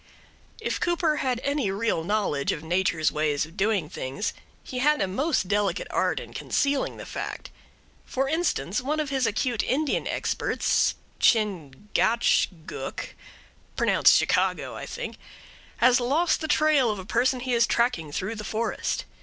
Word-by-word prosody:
If - - -2
Cooper 340 -3 +1
had 250 -3 0
any 280 -7 0
real 195 -4 0
knowledge 185 -7 0
of 150 - -4
Nature's 170 -2 +1
ways 150 -1 0
of 165 +2 -16
doing 200 -5 +1
things, 140 +4 -4 0.3
he 255 - -5
had 300 +3 +3
a 195 - +1
most 265 - 0
delicate 200 -2 0
art - - +1
in - - -10
concealing 280 -1 0
the - - -8
fact. - - -6 0.5
For 270 +1 -1
instance: 310 - 0
one 300 +4 -1
of 300 -2 -2
his 265 -3 +1
acute 230 +2 0
Indian 290 +2 0
experts, - - 0 0.2
Chingachgook 205 - 0 0.7
(pronounced - - +5
Chicago, - - +1
I - - -7
think), - - -6 0.6
has 250 +1 +5
lost 290 +8 +1
the 315 - -2
trail 300 -5 +3
of 210 - -1
a 190 - -7
person 250 +5 +1
he 255 0 -1
is 235 0 +4
tracking 235 -11 0
through 190 +8 -3
the 210 -2 -6
forest. 220 +2 -2
230 Hz, 150 wpm, -26 LUFS, 185-270 Hz, 0.7 s, pronounced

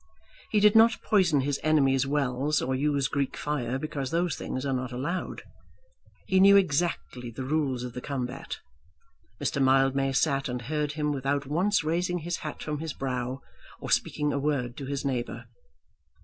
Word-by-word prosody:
He 210 - +3
did 210 +1 +5
not 225 +1 +6
poison 175 -9 +3
his 140 +1 -1
enemies' 135 -4 +3
wells 140 +1 +1
or 130 - -1
use 140 0 +1
Greek 140 0 -2
fire, 130 -4 -2
because 140 -2 -4
those 170 0 0
things 130 +1 -4
are 135 - 0
not 130 0 -2
allowed. 150 +9 -3 0.8
He 190 - +2
knew 200 +1 +8
exactly 150 -8 0
the 120 +3 -6
rules 135 -3 0
of 125 -1 -6
the 125 - -6
combat. 125 -3 -4 0.8
Mr. 140 - -1
Mildmay 135 0 +3
sat 135 -1 +1
and 125 -1 -4
heard 150 +2 -2
him 150 -1 -1
without 140 +1 -1
once 175 +7 +1
raising 175 +3 0
his 170 +1 -3
hat 155 - -6
from 150 -1 -3
his 160 -2 -4
brow, 130 0 -3 0.4
or - - -6
speaking 150 0 +1
a 140 - 0
word 135 -4 -1
to 135 - -6
his 140 0 -3
neighbour. 125 -3 -3
140 Hz, 170 wpm, -27 LUFS, 130-155 Hz, 0.8 s, knew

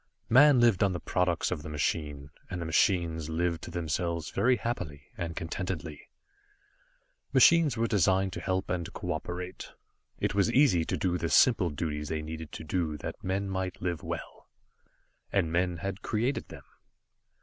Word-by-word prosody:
Man 135 +2 +7
lived 120 -6 +4
on 100 -2 +3
the 90 - -3
products 90 -2 0
of 85 -5 -2
the 75 - -8
machine, 75 -1 -2 0.2
and 90 - -4
the 85 - -4
machines 80 -1 +1
lived 85 +1 -1
to - - -7
themselves 85 -1 -2
very 125 +1 +3
happily, 90 - -4
and 85 -1 -4
contentedly. 85 -2 -5 1.2
Machines 165 -7 +6
are 115 - +2
designed 95 -3 +2
to - - -4
help 95 +1 -1
and 85 -2 -2
cooperate. 90 +1 -5 0.4
It - - -1
was 100 +3 +2
easy 120 - +4
to - - -2
do 90 -1 0
the 85 - -1
simple 110 -6 +5
duties 75 -1 -3
they 80 -1 -2
needed 80 0 -7
to - - -6
do 80 -1 -1
that - - -7
men 95 +2 -1
might 95 -1 -3
live 85 -2 -2
well. - - -7 0.8
And 80 - +1
men 90 0 +1
had 100 +4 -5
created 120 +6 -1
them. - - -11
90 Hz, 160 wpm, -29 LUFS, 80-95 Hz, 1.2 s, Man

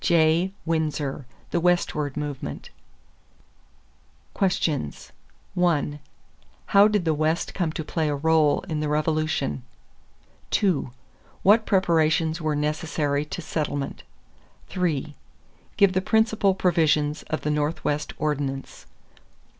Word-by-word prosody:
J. 170 +1 +3
Winsor, 150 -5 -2 0.2
The 175 - +1
Westward 155 -5 0
Movement. 145 - -5 1.6
=Questions= 160 - -1 0.4
1. 155 -4 +1 0.7
How 200 0 +6
did 210 -4 0
the 160 - +2
West 155 +2 0
come 175 -4 -1
to 160 - -4
play 155 0 -1
a 145 - -1
rôle 160 +1 +2
in 160 -5 -3
the 150 -1 -1
Revolution? 155 - 0 0.9
2. 185 -10 +1 0.5
What 215 +3 +5
preparations 165 -3 +2
were 155 -1 0
necessary 150 -1 -1
to 155 +3 -6
settlement? 145 -3 -3 0.7
3. 165 -6 -1 0.6
Give 200 -2 +5
the 185 - +1
principal 220 -1 +2
provisions 155 -5 +2
of 155 - -2
the 150 - -1
Northwest 150 0 -1
Ordinance. 140 -3 -3
155 Hz, 105 wpm, -25 LUFS, 150-175 Hz, 1.6 s, How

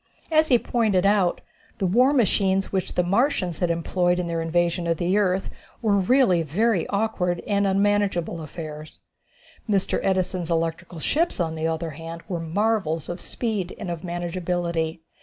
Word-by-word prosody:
As 315 0 +4
he 250 - +5
pointed 215 -6 +1
out, 200 -3 +2 0.4
the 195 - -1
war 245 +9 +4
machines 195 -6 +2
which 190 -2 -2
the 180 - +3
Martians 190 - +1
had 175 - +1
employed 175 +1 +1
in 180 - -1
their 165 -1 -2
invasion 170 +1 0
of 165 -1 +1
the 180 +3 +1
earth, 195 -2 +1 0.3
were 215 -3 +2
really 195 -4 +4
very 185 - +1
awkward 200 -4 0
and 200 -1 +1
unmanageable 195 -4 +1
affairs. 155 -1 -8 0.7
Mr. 195 -2 +1
Edison's 185 -2 0
electrical 165 +1 -2
ships, 315 - 0
on 165 -2 0
the 160 0 -2
other 165 0 -2
hand, 165 +3 -8
were 175 -3 -3
marvels 165 -2 0
of 175 +1 -5
speed 210 -7 -3
and 195 -5 -5
of 170 -2 -5
manageability. 170 -2 -2
180 Hz, 160 wpm, -24 LUFS, 170-200 Hz, 0.7 s, he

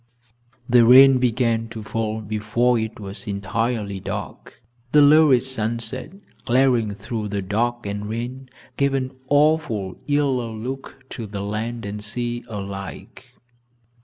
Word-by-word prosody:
The 120 -2 +6
rain 130 +2 +8
began 115 -2 +1
to 110 -1 -7
fall 110 0 -3
before 110 +3 0
it 110 -1 -4
was 100 +3 -8
entirely 105 0 -2
dark. - - -7 0.3
The 150 - +7
lurid 145 -4 +6
sunset, 125 +2 -2 0.3
glaring 120 -4 +2
through 110 +1 -4
the 100 -1 -3
dark 120 +4 -1
and 105 +1 -4
rain, 125 +4 -5 0.3
gave 140 -1 +2
an 130 -1 -2 0.2
awful, 145 - +2
yellow 135 -6 0
look 130 +3 -7
to 115 -3 -6
the 100 -1 -5
land 110 +3 -4
and 105 +1 -5
sea 120 +2 -3
alike. 100 -2 -8
115 Hz, 130 wpm, -22 LUFS, 105-130 Hz, 0.3 s, rain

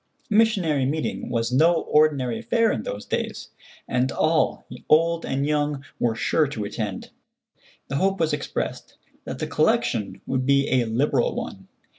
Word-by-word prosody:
A - - +2
missionary 185 -11 +3
meeting 155 +3 -3
was 115 0 -1
no 165 +6 +4
ordinary 140 -6 +2
affair 230 -2 +2
in 110 - -2
those 105 0 -6
days, - - -3 0.4
and 125 +2 0
all, 160 0 +1 0.2
old 165 +2 +3
and 135 +1 -1
young, 145 -2 0 0.2
were 115 -2 +1
sure 150 +6 +1
to 120 -6 -4
attend. 100 -2 -5 0.8
The 135 - -2
hope 195 +4 +1
was 160 -2 +1
expressed 145 - -4 0.3
that - - -5
the - - -3
collection 105 -3 0
would 130 -1 -1
be 140 0 +3
a - - -1
liberal 120 +3 +1
one. - - -6
145 Hz, 155 wpm, -24 LUFS, 125-160 Hz, 0.8 s, no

